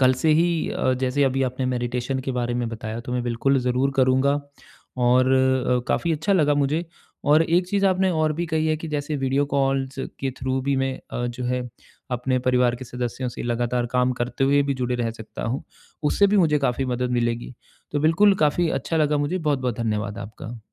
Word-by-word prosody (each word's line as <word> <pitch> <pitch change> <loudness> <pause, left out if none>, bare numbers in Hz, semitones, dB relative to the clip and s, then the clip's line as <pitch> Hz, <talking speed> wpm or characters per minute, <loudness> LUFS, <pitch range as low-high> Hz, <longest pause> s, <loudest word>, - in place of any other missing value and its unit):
कल 130 0 +5
से 160 - +4
ही 165 +1 +2
अ, 130 - 0
जैसे 130 +2 +1
अभी 135 0 +1
आपने 130 0 -1
मैडिटेशन 125 +1 -2
के 130 0 -3
बारे 120 -1 -1
में 120 -1 -1
बताया 115 0 -5
तो 125 +1 -6
मैं 125 -1 -1
बिल्कुल 125 +3 +1
ज़रूर 125 +2 +1
करूँगा। 130 +2 +3 0.6
और 125 +1 +3
अ, 130 -1 +2
काफ़ी 170 -1 +1
अच्छा 160 +6 0
लगा 150 -5 +3
मुझे। 145 +4 0 0.4
और 150 +3 +6
एक 175 +2 +2
चीज़ 200 0 +1
आपने 190 0 +2
और 155 -2 +1
भी 170 +3 -2
कही 160 -1 0
है 155 - +1
कि 160 +1 -7
जैसे 150 0 -2
वीडियो 135 +1 +1
कॉल्स 135 -1 0 0.3
के 135 -1 -1
थ्रू 130 0 -1
भी 140 0 0
मैं 135 0 0 0.2
अ, 120 - -2
जो 120 +1 -5
है 125 0 -2 0.4
अपने 130 +1 0
परिवार 125 -1 +2
के 130 - -8
सदस्यों 125 +1 -4
से 120 - -7
लगातार 120 0 -1
काम 125 0 +2
करते 125 +2 0
हुए 140 +1 +4
भी 140 -1 -1
जुड़े 125 -1 -2
रह 120 -2 -1
सकता 110 -1 -9
हूँ। 120 +4 -2 0.4
उससे 180 +7 +3
भी 205 +1 +2
मुझे 155 -5 +4
काफ़ी 135 -1 0
मदद 125 0 -2
मिलेगी। 120 +1 -2 0.4
तो 145 - 0
बिल्कुल 190 +7 +4
काफ़ी 165 +3 +2
अच्छा 165 - -2
लगा 150 -1 +2
मुझे। 145 +6 -1
बहुत-बहुत 130 -8 -1
धन्यवाद 105 -2 -2
आपका। 110 +2 -8
130 Hz, 205 wpm, -23 LUFS, 125-150 Hz, 0.6 s, और